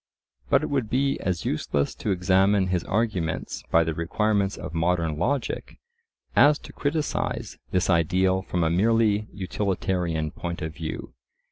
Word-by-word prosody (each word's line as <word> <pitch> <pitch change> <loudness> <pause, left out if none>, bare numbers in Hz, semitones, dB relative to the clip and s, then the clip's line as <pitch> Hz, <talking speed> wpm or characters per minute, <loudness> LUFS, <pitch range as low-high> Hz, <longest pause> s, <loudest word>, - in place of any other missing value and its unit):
But - - +4
it - - -3
would 130 -6 0
be 135 +3 +1
as 90 -4 -2
useless 70 -1 0
to - - -4
examine 95 +1 +3
his 90 -2 0
arguments 100 -7 -1
by 80 - +5
the 80 0 -2
requirements 100 +4 0
of 85 -2 -7
modern 85 -2 0
logic, 135 - -2 0.6
as 145 +1 +6
to - - -13
criticise 150 +1 -2
this 90 - +1
ideal 95 +2 +2
from 90 -2 -1
a 80 - +2
merely 105 +2 +2
utilitarian 90 -5 -1
point 85 +1 -5
of 80 0 -4
view. 80 -5 -6
95 Hz, 145 wpm, -25 LUFS, 85-105 Hz, 0.6 s, as